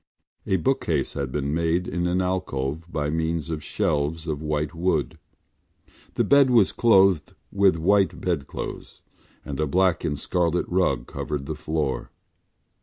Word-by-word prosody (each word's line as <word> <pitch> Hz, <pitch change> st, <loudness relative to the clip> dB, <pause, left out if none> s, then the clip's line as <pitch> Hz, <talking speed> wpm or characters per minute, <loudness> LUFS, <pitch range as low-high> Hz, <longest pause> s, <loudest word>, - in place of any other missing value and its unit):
A 95 Hz, -, +2 dB
bookcase 80 Hz, -, 0 dB
had 70 Hz, -2 st, -3 dB
been 70 Hz, +1 st, -2 dB
made 85 Hz, +2 st, 0 dB
in 85 Hz, -1 st, -1 dB
an 90 Hz, +1 st, +1 dB
alcove 80 Hz, -3 st, -3 dB
by 75 Hz, -1 st, -1 dB
means 80 Hz, 0 st, -2 dB
of 75 Hz, -1 st, -4 dB
shelves 75 Hz, +2 st, -1 dB
of 75 Hz, -3 st, -3 dB
white 75 Hz, 0 st, -2 dB
wood. 80 Hz, -5 st, -1 dB, 1.0 s
The -, -, +2 dB
bed 140 Hz, -2 st, +5 dB
was 115 Hz, -6 st, +4 dB
clothed 95 Hz, -8 st, +3 dB, 0.2 s
with 100 Hz, -3 st, +4 dB
white 95 Hz, +4 st, +2 dB
bedclothes 85 Hz, -7 st, -5 dB, 0.4 s
and 70 Hz, 0 st, -5 dB
a 75 Hz, -, +1 dB
black 90 Hz, +3 st, +2 dB
and 75 Hz, -4 st, -1 dB
scarlet 85 Hz, +3 st, 0 dB
rug 85 Hz, -10 st, +1 dB
covered 70 Hz, +1 st, -4 dB
the 80 Hz, -, -3 dB
foot. 75 Hz, -3 st, -2 dB
80 Hz, 145 wpm, -24 LUFS, 75-90 Hz, 1.0 s, bed